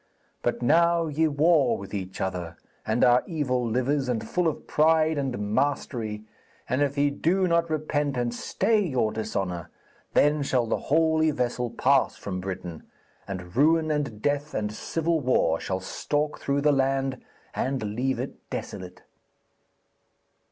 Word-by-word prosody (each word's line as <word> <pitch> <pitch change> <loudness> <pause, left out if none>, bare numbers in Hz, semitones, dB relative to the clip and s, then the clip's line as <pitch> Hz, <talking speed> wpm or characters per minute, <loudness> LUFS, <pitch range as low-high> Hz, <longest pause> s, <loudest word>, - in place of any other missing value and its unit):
But 120 0 -1
now 170 +5 +4
ye 160 +1 +1
war 150 -3 +3
with 100 +1 -9
each 95 -2 -5
other, 90 -3 -3 0.3
and 110 +2 +2
are 125 0 +6
evil 135 -7 -1
livers 130 +4 0
and 115 -3 -2
full 180 -1 +1
of 160 - -3
pride 160 +1 +3
and 120 -8 -2
mastery, 120 -5 -1 0.4
and 130 +4 0
if 145 0 0
ye 145 0 +3
do 185 +6 +1
not 170 -1 +2
repent 150 -3 -1
and 120 -1 -1
stay 215 - +1
your 130 - 0
dishonour, 95 -5 -3 0.5
then 145 +1 +4
shall 130 -3 +1
the 110 - -3
Holy 160 -1 +3
Vessel 125 -3 -1
pass 135 +3 +2
from 95 -2 -5
Britain, 90 -3 -6 0.5
and 90 -2 -7
ruin 155 +3 +3
and 140 -8 -2
death 145 +1 -1
and 105 0 -2
civil 165 +7 -1
war 125 - +2
shall 95 -1 -2
stalk 145 +10 -2
through 140 0 0
the 150 +1 +4
land 135 -1 0 0.3
and 125 -6 -2
leave 130 +3 0
it - - -7
desolate.' - - -7
135 Hz, 150 wpm, -26 LUFS, 110-155 Hz, 0.5 s, are